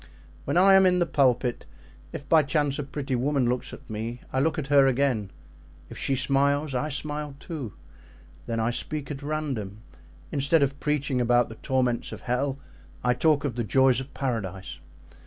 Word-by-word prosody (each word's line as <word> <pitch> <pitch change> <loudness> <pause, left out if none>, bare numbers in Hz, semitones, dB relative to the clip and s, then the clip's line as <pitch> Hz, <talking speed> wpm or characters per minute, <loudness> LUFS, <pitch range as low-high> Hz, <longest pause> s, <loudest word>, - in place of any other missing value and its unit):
When - - 0
I 195 +2 +7
am 190 -1 +7
in 180 0 +3
the 175 - +2
pulpit, 125 -5 +1 0.4
if 140 - -8
by 160 +2 +6
chance 145 -1 0
a - - -1
pretty 140 -1 -5
woman 135 0 +1
looks 125 +1 -2
at - - -12
me, 115 +3 -5
I 130 - +1
look 155 +4 +1
at 155 - -2
her 140 -1 +7
again: 125 -6 +1 0.6
if - - -7
she 135 - 0
smiles, 140 +2 +1
I 130 +4 -1
smile 150 0 -3
too. 140 - -6 0.7
Then 115 -1 -2
I 115 +1 +1
speak 150 +3 -4
at 140 -1 -6
random; 135 -9 -4 0.5
instead 140 +2 +3
of 140 0 -1
preaching 140 -4 0
about 120 0 +3
the 110 - -9
torments 125 -3 0
of - - -8
hell 130 +2 -1 0.5
I 125 - +3
talk 150 +2 +2
of 135 - -1
the 120 - -2
joys 130 +2 +3
of 130 +1 -8
Paradise. 100 -8 -4
135 Hz, 180 wpm, -26 LUFS, 125-145 Hz, 0.7 s, I